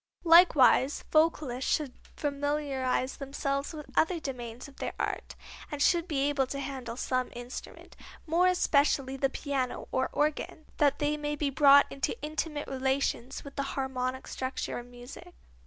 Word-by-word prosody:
Likewise 315 -6 +6
vocalists 305 -5 +2
should 290 -5 0 0.2
familiarize 280 -3 -1
themselves 275 0 -3
with 305 -3 -8
other 335 +1 +2
domains 245 -4 -6
of 280 - -17
their - - -4
art, - - -3 0.4
and 295 - -4
should 340 +3 +3
be 280 -4 0
able 280 -2 +1
to 275 - -5
handle 255 -4 -5
some 255 -1 -1
instrument, 245 +2 -9 0.3
more 335 +3 +3
especially 280 -6 +2
the 270 0 +1
piano 270 -2 -3
or 260 0 0
organ, 305 +1 -1
that 285 -2 +3
they 295 0 0
may 295 0 -2
be 290 -1 -1
brought 280 0 +7
into 275 - -2
intimate 300 0 -3
relations 265 -1 -1
with 280 - -11
the - - +1 0.2
harmonic 260 -1 -2
structure 260 -1 -4
of 240 - -10
music. 245 +9 -12
280 Hz, 150 wpm, -29 LUFS, 260-300 Hz, 0.4 s, brought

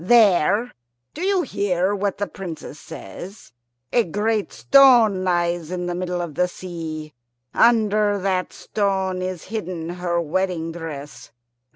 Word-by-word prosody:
There 210 +1 +4 0.4
do 315 - -7
you 380 -1 +2
hear 195 -5 0
what 200 -1 -1
the 205 - -1
Princess 170 -6 -8
says? 165 - -10 0.4
a 240 - +4
great 210 +3 -1
stone 240 -8 +5
lies 175 -2 0
in 180 0 -3
the 175 - -2
middle 180 0 -2
of 165 -3 -6
the 180 +5 +1
sea. 160 -4 -7 0.4
Under 215 -3 +3
that 185 -1 -1
stone 190 -3 -1
is 185 -2 -4
hidden 180 -6 -4
her 175 -1 -1
wedding 170 0 -1
dress. 155 -4 -8
185 Hz, 135 wpm, -22 LUFS, 170-205 Hz, 0.4 s, stone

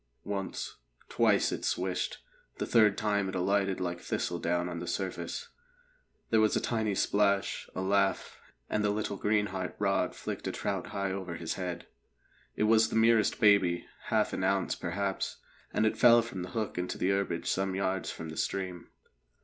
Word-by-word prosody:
Once, 100 -2 -4 0.3
twice - - +3
it - - -4
swished; 90 0 -1 0.3
the - - -2
third 105 -4 +4
time 100 -2 0
it 95 - -5
alighted 95 +1 +1
like 85 -1 -2
thistledown 85 0 -1
on 85 -1 -4
the 85 - -6
surface. 95 +1 -3 0.8
There 110 -1 +5
was 110 - +3
a - - +3
tiny 110 -4 -1
splash, 100 0 +1
a - - -2
laugh, 100 0 +1 0.3
and 105 - 0
the 105 - +2
little 105 0 -1
greenheart 100 -2 -1
rod 100 -1 +1
flicked - - -5
a - - 0
trout - - -3
high 100 -1 -2
over 95 -3 -4
his 80 -1 -3
head. 90 -2 -4 0.7
It - - 0
was 110 0 +5
the - - -4
merest 115 -1 +4
baby 100 -6 +4 0.2
half - - +1
an - - -2
ounce, 95 0 +1
perhaps 95 +2 -2 0.3
and 110 - +1
it 110 - 0
fell 120 -1 +7
from 100 -5 -6
the 90 - -5
hook 105 0 -3
into 90 - -3
the 95 - +1
herbage 95 -4 -1
some 95 0 0
yards 95 -1 -1
from 80 - -6
the 80 - -8
stream. 90 -3 -3
95 Hz, 175 wpm, -30 LUFS, 90-105 Hz, 0.8 s, fell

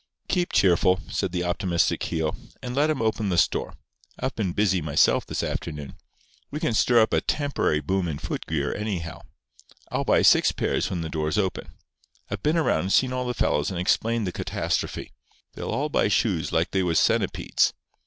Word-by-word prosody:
"Keep 180 -1 0
cheerful," 90 0 +3
said - - -1
the 90 0 -1
optimistic 90 0 0
Keogh. 80 -2 -2 0.3
"And 125 - -4
let 145 +3 +3
'em 150 -7 0
open 110 -2 0
the 90 - 0
store. - - +1 0.4
I've 130 - -2
been 100 -5 -1
busy 95 -1 +1
myself 75 -2 +2
this - - -3
afternoon. 75 -4 -4 0.6
We 150 - -4
can 120 - 0
stir 120 +1 +4
up 110 - -2
a - - +3
temporary 140 - 0
boom 95 0 -1
in 75 -3 -3
foot - - -5
gear 75 -2 -1
anyhow. 95 -7 -4 0.7
I'll - - 0
buy - - +3
six - - +5
pairs - - -1
when 90 -3 -3
the 80 - -3
doors 80 +1 -1
open. 95 -3 -2 0.6
I've - - -3
been 155 +3 +1
around 160 - +2
and 95 +4 -1
seen 130 -1 +3
all 125 -1 -2
the 125 - -2
fellows 75 -7 +1
and 90 -3 -4
explained 115 +5 +1
the 90 - -2
catastrophe. - - -3 0.4
They'll - - -6
all 145 +3 -1
buy - - +2
shoes 100 -5 0
like 80 +1 +1
they 95 - +1
was 85 -3 +2
centipedes. - - +1
95 Hz, 190 wpm, -25 LUFS, 85-115 Hz, 0.7 s, six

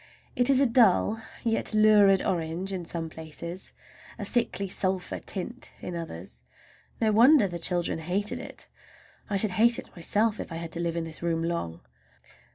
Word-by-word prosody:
It 245 +1 +6
is 270 -1 +4
a 275 - +4
dull 225 -2 +3 0.2
yet 225 -1 +2
lurid 210 -2 +5
orange 175 +2 -2
in 180 -2 -4
some 165 -1 -4
places, 160 +3 -8 0.5
a - - -5
sickly 230 -4 0
sulphur 185 0 -1
tint 235 +6 -5
in 180 - -6
others. 95 - -8 0.6
No 220 -2 +2
wonder 235 +2 +6
the 175 -2 -6
children 175 -1 +1
hated 185 +6 -1
it! - - -5 0.6
I 200 - 0
should 205 0 +1
hate 235 0 +5
it - - -10
myself 210 +5 0
if - - -6
I - - -5
had 165 0 -6
to 165 - -2
live 170 -1 -2
in 170 - -2
this 160 -1 -4
room 165 -1 -1
long. 165 - -3
185 Hz, 170 wpm, -27 LUFS, 170-215 Hz, 0.6 s, It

